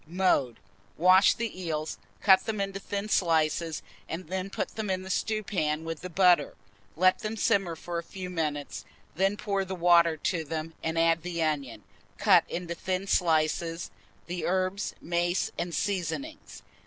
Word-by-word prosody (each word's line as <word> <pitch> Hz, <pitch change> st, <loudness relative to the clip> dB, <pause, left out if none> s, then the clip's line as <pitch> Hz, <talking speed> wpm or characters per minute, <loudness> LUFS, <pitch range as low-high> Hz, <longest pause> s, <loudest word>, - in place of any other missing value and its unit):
Mode. 165 Hz, -9 st, +1 dB, 0.4 s
Wash 185 Hz, +3 st, +6 dB
the 225 Hz, -5 st, -4 dB
eels, 155 Hz, -3 st, -3 dB, 0.2 s
cut 190 Hz, +2 st, +5 dB
them 215 Hz, -2 st, -2 dB
into 195 Hz, 0 st, -2 dB
thin 200 Hz, +1 st, -4 dB
slices, 165 Hz, -4 st, +1 dB, 0.3 s
and 165 Hz, +1 st, -5 dB, 0.2 s
put -, -, -2 dB
them 220 Hz, -2 st, -5 dB
in 185 Hz, 0 st, -1 dB
the 190 Hz, -, -5 dB
stewpan 185 Hz, -9 st, -1 dB
with 165 Hz, -1 st, -5 dB
the 180 Hz, -, -6 dB
butter; 175 Hz, -4 st, +4 dB, 0.4 s
let 185 Hz, +3 st, +4 dB
them 215 Hz, +1 st, -4 dB
simmer 195 Hz, -6 st, +1 dB
for 170 Hz, +1 st, -4 dB
a -, -, -6 dB
few 185 Hz, +2 st, -7 dB
minutes, 150 Hz, -, -3 dB, 0.3 s
then 195 Hz, +3 st, +1 dB
pour 200 Hz, -2 st, -1 dB
the 190 Hz, 0 st, -5 dB
water 170 Hz, -2 st, +4 dB
to 165 Hz, +2 st, -1 dB
them, 160 Hz, +1 st, -5 dB
and 160 Hz, 0 st, -2 dB
add 165 Hz, 0 st, +3 dB
the 170 Hz, -1 st, -2 dB
onion, 140 Hz, -9 st, -2 dB, 0.3 s
cut -, -, +5 dB
in 180 Hz, -, -4 dB
thin 185 Hz, +3 st, -3 dB
slices, 165 Hz, -, +1 dB, 0.3 s
the 175 Hz, 0 st, -4 dB
herbs, 185 Hz, +2 st, -1 dB
mace, 175 Hz, +1 st, 0 dB
and 170 Hz, -2 st, -3 dB
seasoning. 200 Hz, -, -2 dB
175 Hz, 155 wpm, -28 LUFS, 160-190 Hz, 0.4 s, Wash